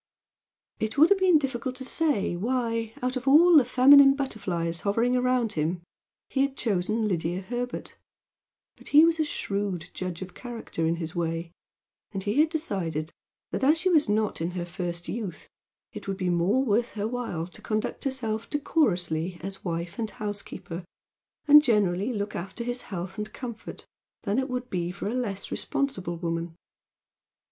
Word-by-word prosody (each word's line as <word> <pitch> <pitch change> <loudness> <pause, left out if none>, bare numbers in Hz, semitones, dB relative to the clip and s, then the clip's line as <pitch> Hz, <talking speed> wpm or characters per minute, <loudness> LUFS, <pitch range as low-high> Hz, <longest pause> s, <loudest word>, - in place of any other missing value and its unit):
It 220 +2 -2
would 315 +6 +6
have 400 - +5
been 370 -4 +6
difficult 260 -2 -3
to 260 - -5
say 265 - +1
why, 230 +2 -1
out 255 +1 0
of 255 +1 -4
all 330 +5 +7
the 295 - +8
feminine 275 +3 +7
butterflies 175 -11 -2
hovering 230 +5 +1
around 250 -3 +1
him, 165 +3 -1 0.4
he 270 - 0
had 275 0 0
chosen 215 +1 0
Lydia 175 -1 -1
Herbert, 245 +4 -5 0.8
but - - -15
he 300 +2 +7
was 330 -1 +2
a - - +4
shrewd 200 - -3
judge 185 -1 -4
of 185 -1 -11
character 230 -9 -4
in 165 - +1
his 165 0 -5
way, 165 0 -2 0.6
and 195 -2 -4
he 210 +7 0
had 310 +1 +5
decided 170 - -2 0.4
that - - -2
as 300 +4 +5
she 370 +3 +1
was 305 -8 +4
not 210 -4 0
in 165 - 0
her 175 - -2
first 175 -1 -5
youth 210 -6 -5 0.4
it - - -9
would 195 -1 -2
be 185 -2 0
more 185 +10 +2
worth 235 +1 +1
her 210 0 -2
while 230 -9 -3
to 175 - -13
conduct 215 0 -2
herself 230 -5 -2
decorously 180 - 0
as 195 +2 -6
wife 170 +2 -4
and 220 -2 -1
housekeeper, 195 -5 -6 0.6
and 295 +1 +10
generally 210 -3 +2
look 205 -2 -3
after 195 +6 -5
his 245 +1 -2
health 190 +1 -5
and 210 +1 -5
comfort, 235 -3 -8 0.4
than 205 +3 +1
it 265 +1 -2
would 250 0 -3
be 175 -2 -1
for 195 +3 -5
a 215 - -2
less 210 -6 -3
responsible 185 -12 -2
woman. 165 -1 -3
215 Hz, 170 wpm, -27 LUFS, 175-255 Hz, 0.8 s, and